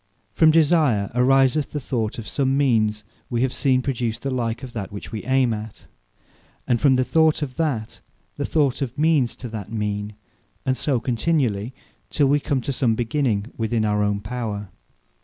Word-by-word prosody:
From 160 Hz, -, +5 dB
Desire, 150 Hz, -, +3 dB
ariseth 135 Hz, +3 st, +3 dB
the 150 Hz, -, -1 dB
Thought 115 Hz, -5 st, -2 dB
of 115 Hz, -, -7 dB
some 135 Hz, -1 st, 0 dB
means 110 Hz, -6 st, +2 dB, 0.3 s
we 120 Hz, 0 st, 0 dB
have 130 Hz, -, 0 dB
seen 130 Hz, -2 st, +2 dB
produce 120 Hz, -4 st, -2 dB
the 135 Hz, +3 st, -4 dB
like 120 Hz, -1 st, -2 dB
of 125 Hz, -2 st, -8 dB
that 100 Hz, -5 st, -5 dB
which 100 Hz, -, -8 dB
we 110 Hz, -, -4 dB
ayme 130 Hz, -2 st, +2 dB
at; 110 Hz, 0 st, -8 dB, 0.8 s
and 120 Hz, -3 st, +1 dB
from 140 Hz, -3 st, +5 dB
the 130 Hz, -, +2 dB
thought 160 Hz, +2 st, +2 dB
of 130 Hz, -3 st, -5 dB
that, 140 Hz, -10 st, -2 dB, 0.3 s
the -, -, -3 dB
thought 145 Hz, -4 st, +1 dB
of 130 Hz, -2 st, -3 dB
means 150 Hz, -5 st, +2 dB
to 125 Hz, -, -8 dB
that 110 Hz, -2 st, -7 dB
mean; 105 Hz, -1 st, -3 dB, 0.5 s
and 130 Hz, -, +1 dB
so 130 Hz, -2 st, 0 dB
continually, 125 Hz, -3 st, 0 dB, 0.3 s
till 145 Hz, -, +2 dB
we 145 Hz, +2 st, +3 dB
come 140 Hz, -2 st, -1 dB
to 140 Hz, -, -3 dB
some 120 Hz, -3 st, +1 dB
beginning 115 Hz, -2 st, -1 dB
within 110 Hz, -1 st, 0 dB
our 105 Hz, 0 st, +1 dB
own 105 Hz, -1 st, 0 dB
power. 105 Hz, -3 st, -4 dB
125 Hz, 180 wpm, -23 LUFS, 110-140 Hz, 0.8 s, From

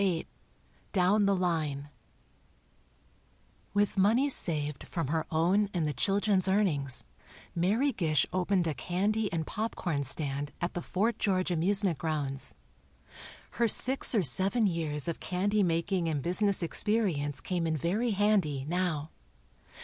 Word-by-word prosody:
VIII 180 Hz, -5 st, 0 dB, 0.7 s
"DOWN 200 Hz, +2 st, +2 dB
THE 200 Hz, -, +2 dB
LINE" 155 Hz, -6 st, -2 dB, 1.9 s
With 205 Hz, -1 st, +1 dB
money 230 Hz, +9 st, +3 dB
saved 150 Hz, -, +3 dB
from 165 Hz, -6 st, -4 dB
her 160 Hz, +1 st, -2 dB
own 180 Hz, +6 st, +1 dB
and 170 Hz, -3 st, 0 dB
the 150 Hz, -, -2 dB
children's 195 Hz, -, +1 dB
earnings, 155 Hz, -10 st, +1 dB, 0.5 s
Mary 210 Hz, +11 st, +1 dB
Gish 155 Hz, -, 0 dB
opened 185 Hz, 0 st, 0 dB
a 160 Hz, -, -1 dB
candy 200 Hz, -, -2 dB
and 160 Hz, -2 st, -2 dB
popcorn 175 Hz, -9 st, -3 dB
stand 145 Hz, +1 st, -2 dB
at 175 Hz, 0 st, -3 dB
the 175 Hz, -, -4 dB
Fort 215 Hz, +7 st, -2 dB
George 185 Hz, -2 st, 0 dB
amusement 180 Hz, -1 st, +1 dB
grounds. 145 Hz, -4 st, -2 dB, 1.0 s
Her 235 Hz, -, 0 dB
six 255 Hz, +3 st, +5 dB
or 205 Hz, -, +2 dB
seven 190 Hz, -, +2 dB
years 160 Hz, -5 st, -1 dB
of 170 Hz, -, -3 dB
candy 205 Hz, +3 st, -1 dB
making 175 Hz, 0 st, 0 dB
and 145 Hz, -4 st, -3 dB
business 195 Hz, +2 st, +3 dB
experience 170 Hz, -8 st, 0 dB
came 175 Hz, -3 st, -3 dB
in 160 Hz, -1 st, -1 dB
very 200 Hz, -, -1 dB
handy, 195 Hz, -10 st, 0 dB
now. 165 Hz, -3 st, -2 dB
180 Hz, 135 wpm, -29 LUFS, 155-200 Hz, 1.9 s, six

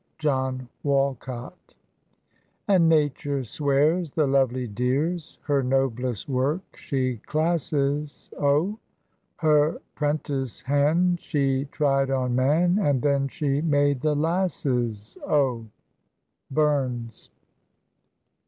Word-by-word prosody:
JOHN 130 Hz, -4 st, -1 dB, 0.2 s
WALCOT. 135 Hz, +1 st, -2 dB, 0.9 s
"And 180 Hz, -5 st, +4 dB
Nature 145 Hz, -3 st, +1 dB
swears, 150 Hz, +7 st, +1 dB
the 155 Hz, +2 st, +1 dB
lovely 130 Hz, -2 st, +1 dB
dears 140 Hz, -, -1 dB
Her 140 Hz, -2 st, +1 dB
noblest 125 Hz, -3 st, -1 dB
work 140 Hz, +7 st, -1 dB
she 130 Hz, -3 st, -2 dB
classes, 150 Hz, 0 st, -1 dB
O; 150 Hz, +10 st, +1 dB, 0.6 s
Her 155 Hz, -2 st, +2 dB
'prentice 145 Hz, -4 st, -2 dB
han' 155 Hz, +6 st, +2 dB
she 140 Hz, -4 st, 0 dB
tried 135 Hz, -2 st, +1 dB
on 130 Hz, -2 st, 0 dB
man, 160 Hz, +9 st, +3 dB
And 145 Hz, -, +1 dB
then 140 Hz, -1 st, +2 dB
she 140 Hz, 0 st, -1 dB
made 145 Hz, -4 st, +2 dB
the 150 Hz, 0 st, +1 dB
lasses, 135 Hz, -, -1 dB
O." 130 Hz, -6 st, +1 dB, 0.8 s
BURNS. 130 Hz, -6 st, -1 dB
140 Hz, 95 wpm, -25 LUFS, 130-155 Hz, 0.9 s, And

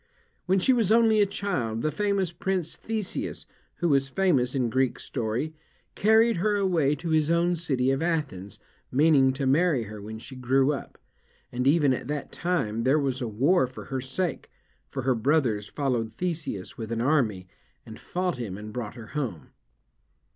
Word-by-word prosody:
When 190 Hz, +2 st, +3 dB
she 225 Hz, +8 st, +4 dB
was 225 Hz, -5 st, +2 dB
only 225 Hz, -2 st, +5 dB
a 200 Hz, -, +4 dB
child, 125 Hz, -, -2 dB
the 155 Hz, -, +1 dB
famous 200 Hz, 0 st, 0 dB
prince 175 Hz, -1 st, -2 dB
Theseus, 220 Hz, -3 st, -4 dB, 0.3 s
who 175 Hz, -, 0 dB
was 135 Hz, -2 st, +3 dB
famous 140 Hz, -8 st, +1 dB
in 125 Hz, -4 st, 0 dB
Greek 130 Hz, -1 st, +1 dB
Story, 120 Hz, +6 st, -3 dB, 0.4 s
carried 220 Hz, +1 st, +4 dB
her 210 Hz, +4 st, +1 dB
away 170 Hz, -8 st, +2 dB
to 165 Hz, +4 st, -5 dB
his 155 Hz, -1 st, +2 dB
own 170 Hz, +1 st, +2 dB
city 135 Hz, -6 st, 0 dB
of 135 Hz, +2 st, 0 dB
Athens, 150 Hz, -, -2 dB, 0.3 s
meaning 140 Hz, -1 st, +5 dB
to 135 Hz, +1 st, -3 dB
marry 145 Hz, -1 st, +3 dB
her 105 Hz, -1 st, -9 dB
when 110 Hz, +2 st, -7 dB
she 130 Hz, +4 st, -10 dB
grew 130 Hz, +3 st, +2 dB
up, 140 Hz, -, -7 dB, 0.5 s
and 125 Hz, +2 st, -1 dB
even 145 Hz, -2 st, +4 dB
at 125 Hz, -, -4 dB
that 145 Hz, -1 st, -4 dB
time, 140 Hz, -12 st, -1 dB
there 130 Hz, +5 st, +3 dB
was 135 Hz, -3 st, -1 dB
a 120 Hz, -, -1 dB
war 130 Hz, -, +2 dB
for 130 Hz, -, -10 dB
her 130 Hz, -, -1 dB
sake, 160 Hz, +5 st, -3 dB, 0.4 s
for 130 Hz, -, -4 dB
her 130 Hz, 0 st, +3 dB
brothers 115 Hz, -4 st, +1 dB
followed 120 Hz, -4 st, -1 dB
Theseus 160 Hz, -, -4 dB
with 110 Hz, 0 st, -5 dB
an 115 Hz, -, -1 dB
army, 115 Hz, -9 st, +1 dB, 0.4 s
and 110 Hz, -, -10 dB
fought 180 Hz, -3 st, -2 dB
him, 105 Hz, -6 st, -5 dB
and 105 Hz, 0 st, -8 dB
brought 115 Hz, -2 st, -5 dB
her 115 Hz, -3 st, -10 dB
home. 130 Hz, -, -4 dB
140 Hz, 175 wpm, -26 LUFS, 120-175 Hz, 0.5 s, only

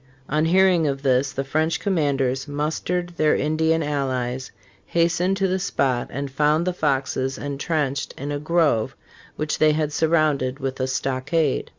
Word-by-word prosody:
On 155 Hz, +2 st, +1 dB
hearing 180 Hz, -2 st, +4 dB
of 135 Hz, 0 st, -2 dB
this 135 Hz, 0 st, +2 dB
the 135 Hz, -, -3 dB
French 155 Hz, +4 st, 0 dB
commanders 140 Hz, -8 st, 0 dB
mustered 160 Hz, +5 st, -2 dB
their 155 Hz, -1 st, +3 dB
Indian 160 Hz, +2 st, +1 dB
allies, 130 Hz, -3 st, -2 dB, 0.4 s
hastened 175 Hz, +3 st, +1 dB
to 195 Hz, -1 st, +1 dB
the 185 Hz, +1 st, 0 dB
spot, 130 Hz, -9 st, 0 dB
and 140 Hz, +2 st, -5 dB
found 150 Hz, +4 st, +2 dB
the 180 Hz, -, 0 dB
Foxes 135 Hz, -4 st, -1 dB
intrenched 140 Hz, -1 st, -2 dB
in 145 Hz, +2 st, -4 dB
a 145 Hz, -, -2 dB
grove 155 Hz, -8 st, +1 dB, 0.4 s
which 155 Hz, -1 st, -2 dB
they 155 Hz, -1 st, +5 dB
had 150 Hz, -1 st, -1 dB
surrounded 155 Hz, -5 st, +1 dB
with 135 Hz, -1 st, -4 dB
a 130 Hz, -, 0 dB
stockade." 135 Hz, +3 st, -1 dB
150 Hz, 155 wpm, -23 LUFS, 135-160 Hz, 0.4 s, they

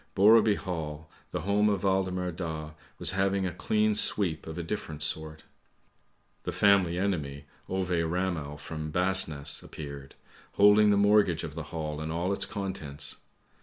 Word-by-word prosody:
Borreby 105 Hz, +1 st, +6 dB
Hall, 80 Hz, -5 st, -5 dB, 0.2 s
the -, -, -3 dB
home 105 Hz, +2 st, +2 dB
of 100 Hz, -2 st, -1 dB
Waldemar 95 Hz, -2 st, 0 dB
Daa 80 Hz, -3 st, -5 dB, 0.3 s
was 80 Hz, -, +1 dB
having 95 Hz, 0 st, +1 dB
a 90 Hz, -, -2 dB
clean 105 Hz, +4 st, +1 dB
sweep 90 Hz, -7 st, +1 dB
of 80 Hz, +1 st, -6 dB
a 85 Hz, -, -3 dB
different 80 Hz, -4 st, -4 dB
sort. 80 Hz, 0 st, -3 dB, 1.0 s
The -, -, -4 dB
family 100 Hz, -4 st, +3 dB
enemy 75 Hz, -8 st, -2 dB, 0.2 s
Ove 95 Hz, -1 st, -2 dB
Ramel 85 Hz, -3 st, -1 dB
from 75 Hz, +1 st, -6 dB
Basness 90 Hz, -4 st, +1 dB
appeared, 70 Hz, -2 st, -9 dB, 0.4 s
holding 105 Hz, +1 st, +6 dB
the 100 Hz, -, +4 dB
mortgage 100 Hz, -4 st, +3 dB
of 80 Hz, -2 st, -6 dB
the 80 Hz, -1 st, -6 dB
Hall 75 Hz, -2 st, -4 dB
and 80 Hz, 0 st, -4 dB
all 85 Hz, +4 st, -1 dB
its -, -, +1 dB
contents. 85 Hz, -8 st, -4 dB
90 Hz, 150 wpm, -28 LUFS, 80-100 Hz, 1.0 s, Borreby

